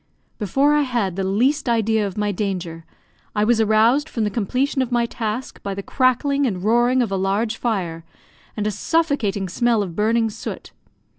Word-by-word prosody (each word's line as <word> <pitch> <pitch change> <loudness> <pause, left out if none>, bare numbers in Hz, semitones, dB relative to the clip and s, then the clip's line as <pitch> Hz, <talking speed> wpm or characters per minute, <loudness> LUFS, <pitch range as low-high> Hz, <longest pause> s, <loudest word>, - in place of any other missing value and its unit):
Before 270 +8 +2
I 295 - +3
had 235 -9 -1
the 195 - -2
least 250 +9 +1
idea 220 -2 +1
of 195 - -8
my 210 0 0
danger, 180 -5 -4 0.5
I 210 - +2
was 225 +1 +3
aroused 225 +8 +3
from 225 - -2
the 210 - 0
completion 255 +6 0
of 255 - -2
my 240 -1 +2
task 230 +1 -4
by 200 -1 -4
the 200 - -5
crackling 275 +3 +1
and 185 -5 -3
roaring 240 +4 +3
of 220 - -4
a - - 0
large 200 +4 0
fire, 180 -10 -2 0.5
and 210 - -1
a 215 - +1
suffocating 210 - 0
smell 230 +3 +1
of 175 -4 -7
burning 225 +1 +1
soot. 220 - -7
220 Hz, 180 wpm, -21 LUFS, 200-250 Hz, 0.5 s, I